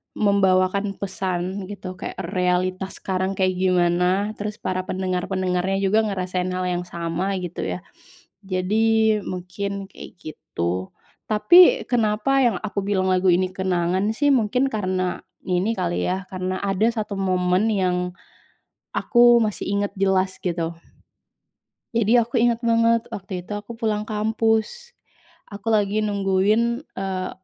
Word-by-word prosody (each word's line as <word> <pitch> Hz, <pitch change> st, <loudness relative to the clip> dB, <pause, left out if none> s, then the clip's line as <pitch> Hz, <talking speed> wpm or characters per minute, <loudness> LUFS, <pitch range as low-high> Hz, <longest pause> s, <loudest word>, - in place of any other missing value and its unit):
membawakan 195 Hz, -1 st, +2 dB
pesan, 190 Hz, 0 st, -3 dB
gitu. 185 Hz, -2 st, -8 dB
Kayak -, -, -5 dB, 0.2 s
realitas 185 Hz, +1 st, 0 dB
sekarang 190 Hz, 0 st, -2 dB
kayak 185 Hz, -1 st, 0 dB
gimana, 180 Hz, +2 st, +2 dB
terus 210 Hz, 0 st, -4 dB
para 185 Hz, 0 st, -3 dB
pendengar-pendengarnya 185 Hz, +1 st, -1 dB
juga 205 Hz, +3 st, +3 dB
ngerasain 185 Hz, -2 st, -2 dB
hal 185 Hz, -, -2 dB
yang 180 Hz, 0 st, -2 dB
sama, 170 Hz, +4 st, -2 dB
gitu, 175 Hz, -1 st, -6 dB, 0.2 s
ya. 90 Hz, -, -9 dB, 0.6 s
Jadi, 215 Hz, +3 st, +2 dB
mungkin 195 Hz, +2 st, -4 dB
kayak -, -, -11 dB
gitu. 95 Hz, -, -4 dB, 0.4 s
Tapi, 350 Hz, -, +6 dB
kenapa 230 Hz, +3 st, +1 dB
yang 235 Hz, -5 st, +3 dB
aku 205 Hz, -1 st, -3 dB
bilang 190 Hz, -2 st, +1 dB
lagu 185 Hz, 0 st, +2 dB
ini 185 Hz, +1 st, +2 dB
kenangan, 185 Hz, +1 st, 0 dB
sih, 290 Hz, +1 st, +3 dB
mungkin 250 Hz, +2 st, +2 dB
karena 185 Hz, -3 st, -1 dB, 0.2 s
ini 185 Hz, +5 st, 0 dB
kali, 175 Hz, -2 st, -1 dB
ya, 185 Hz, +1 st, -2 dB
karena 185 Hz, 0 st, -3 dB
ada 200 Hz, +2 st, +1 dB
1 215 Hz, -3 st, -4 dB
momen 185 Hz, +1 st, +1 dB
yang, 180 Hz, -2 st, 0 dB, 0.8 s
aku 240 Hz, -1 st, +5 dB
masih 210 Hz, -2 st, -2 dB
ingat 200 Hz, 0 st, -1 dB
jelas, 190 Hz, -1 st, +1 dB
gitu. 170 Hz, -2 st, -2 dB, 1.2 s
Jadi, 230 Hz, +1 st, +4 dB
aku 235 Hz, 0 st, -1 dB
ingat 235 Hz, -1 st, +2 dB
banget, 230 Hz, 0 st, +3 dB
waktu 190 Hz, -2 st, -5 dB
itu, 210 Hz, -, -8 dB
aku 205 Hz, +3 st, -8 dB
pulang 215 Hz, -2 st, -1 dB
kampus, 225 Hz, -, 0 dB, 0.6 s
aku 205 Hz, +2 st, -7 dB
lagi 210 Hz, 0 st, +2 dB
nungguin, 210 Hz, +5 st, +1 dB
eee, 190 Hz, -1 st, -3 dB
195 Hz, 130 wpm, -23 LUFS, 185-215 Hz, 1.2 s, Tapi